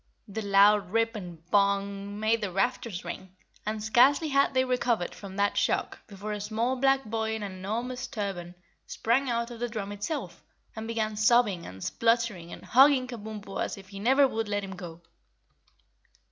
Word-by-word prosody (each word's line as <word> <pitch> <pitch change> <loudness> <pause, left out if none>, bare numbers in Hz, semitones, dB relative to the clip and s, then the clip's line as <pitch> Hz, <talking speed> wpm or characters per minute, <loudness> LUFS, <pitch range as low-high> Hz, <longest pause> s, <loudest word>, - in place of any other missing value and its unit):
The 215 +2 -5
loud 200 -1 +5
rip 225 +2 +1
and 175 -5 -9
BONG 200 0 +1
made 220 +1 +2
the 200 -3 -2
rafters 210 0 -1
ring, 190 0 -7 0.3
and 215 0 -2
scarcely 265 +8 +4
had 275 -1 +2
they 260 0 +3
recovered 240 -7 0
from 195 -2 -10
that 200 0 +1
shock - - 0
before 205 0 -7
a 210 -1 -3
small 225 +5 -1
black 270 0 +2
boy 220 0 -2
in 220 - -5
an 200 - -4
enormous 235 +7 -4
turban 190 -6 -5 0.3
sprang 255 +4 +1
out 235 0 -1
of 235 - -9
the 240 0 -2
drum 210 -3 -4
itself 205 - -5 0.3
and 220 0 -5
began 220 -2 -1
sobbing 215 -4 +3
and 95 0 -9
spluttering 230 -7 0
and - - -10
hugging 265 +1 +6
Kabumpo 215 -4 -6
as - - -4
if 195 -1 -13
he 195 -1 -8
never 265 +6 +4
would 225 -3 -3
let 205 -1 -1
him 195 -1 -6
go. 170 -2 -9
215 Hz, 175 wpm, -28 LUFS, 200-240 Hz, 0.3 s, hugging